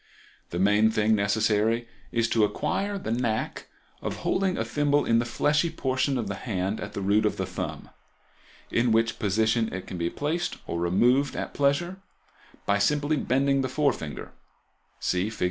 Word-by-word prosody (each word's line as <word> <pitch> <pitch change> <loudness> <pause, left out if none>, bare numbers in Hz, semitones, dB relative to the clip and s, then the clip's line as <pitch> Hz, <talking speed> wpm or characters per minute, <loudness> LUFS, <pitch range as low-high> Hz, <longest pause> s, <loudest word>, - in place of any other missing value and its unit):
The 85 - -4
main 105 +4 +4
thing 110 0 +2
necessary 110 +2 +1 0.2
is 115 -1 +1
to 110 - +3
acquire 200 - -1
the 110 - -4
knack 115 -2 -2 0.3
of - - -3
holding 190 -1 +1
a - - -1
thimble 145 0 +1
in 115 0 +3
the 120 - 0
fleshy 150 +7 +1
portion 130 -3 0
of 115 -4 -2
the 100 - -2
hand 100 -1 -2
at 100 - -6
the 100 - -4
root 100 +3 +3
of 105 - 0
the 95 - -1
thumb, 90 - -5 0.8
in 120 0 +2
which 115 +1 +2
position 110 +2 +1
it 95 0 -5
can 90 - -6
be 85 0 0
placed, 160 - -2
or 85 - -3
removed 120 +11 +2
at - - -4
pleasure, 145 +6 +1 0.7
by 100 0 +2
simply 145 +7 +2
bending 135 0 +1
the 130 - -2
forefinger 130 - -1 0.7
(see 90 +3 0
Figs. 110 - -10
115 Hz, 170 wpm, -26 LUFS, 105-140 Hz, 0.8 s, main